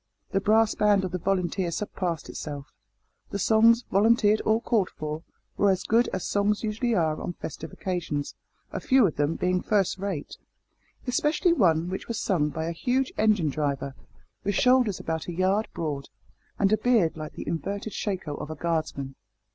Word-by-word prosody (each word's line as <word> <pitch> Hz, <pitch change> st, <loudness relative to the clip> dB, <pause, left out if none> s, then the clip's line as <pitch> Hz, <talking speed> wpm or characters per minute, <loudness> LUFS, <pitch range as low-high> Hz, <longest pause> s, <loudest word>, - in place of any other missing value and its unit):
The 195 Hz, -2 st, +1 dB
brass 220 Hz, +2 st, +4 dB
band 205 Hz, -2 st, +3 dB
of 185 Hz, -, -4 dB
the 185 Hz, -, -2 dB
volunteers 180 Hz, -1 st, -1 dB
surpassed 180 Hz, -5 st, -3 dB
itself. 145 Hz, -2 st, -7 dB, 0.6 s
The -, -, -3 dB
songs 230 Hz, +3 st, +5 dB
volunteered 215 Hz, +1 st, +4 dB
or 220 Hz, +1 st, +3 dB
called 225 Hz, -5 st, +1 dB
for 155 Hz, +1 st, -5 dB, 0.4 s
were 200 Hz, -, +4 dB
as 190 Hz, -1 st, +1 dB
good 230 Hz, +2 st, +3 dB
as 190 Hz, -, -3 dB
songs 205 Hz, +1 st, +1 dB
usually 225 Hz, +2 st, 0 dB
are 160 Hz, -4 st, +1 dB
on 175 Hz, -, -4 dB
festive 160 Hz, -1 st, -7 dB
occasions, 165 Hz, -6 st, -3 dB, 0.4 s
a -, -, -3 dB
few 260 Hz, -4 st, +4 dB
of 165 Hz, -, -1 dB
them 145 Hz, +3 st, +1 dB
being 180 Hz, 0 st, 0 dB
first 200 Hz, -3 st, +1 dB
rate, 195 Hz, -7 st, -4 dB, 0.7 s
especially 305 Hz, +6 st, +2 dB
one 170 Hz, -, +3 dB
which 185 Hz, +1 st, -5 dB
was 230 Hz, -2 st, -3 dB
sung 155 Hz, -6 st, +1 dB
by 160 Hz, +2 st, -4 dB
a 165 Hz, -, -2 dB
huge 255 Hz, +9 st, 0 dB
engine 210 Hz, -7 st, +3 dB
driver, 140 Hz, -2 st, -2 dB, 0.5 s
with 205 Hz, 0 st, -1 dB
shoulders 250 Hz, -5 st, +3 dB
about 160 Hz, -1 st, -3 dB
a 175 Hz, -, -4 dB
yard 190 Hz, +5 st, +1 dB
broad, 145 Hz, -4 st, -4 dB, 0.5 s
and 200 Hz, +1 st, +3 dB
a -, -, +4 dB
beard 215 Hz, -7 st, +2 dB
like 155 Hz, -1 st, -7 dB
the -, -, -8 dB
inverted 200 Hz, +6 st, -3 dB
shako 190 Hz, -7 st, -3 dB
of -, -, -6 dB
a 155 Hz, -, -5 dB
guardsman. 155 Hz, -5 st, -2 dB
190 Hz, 175 wpm, -26 LUFS, 160-215 Hz, 0.7 s, songs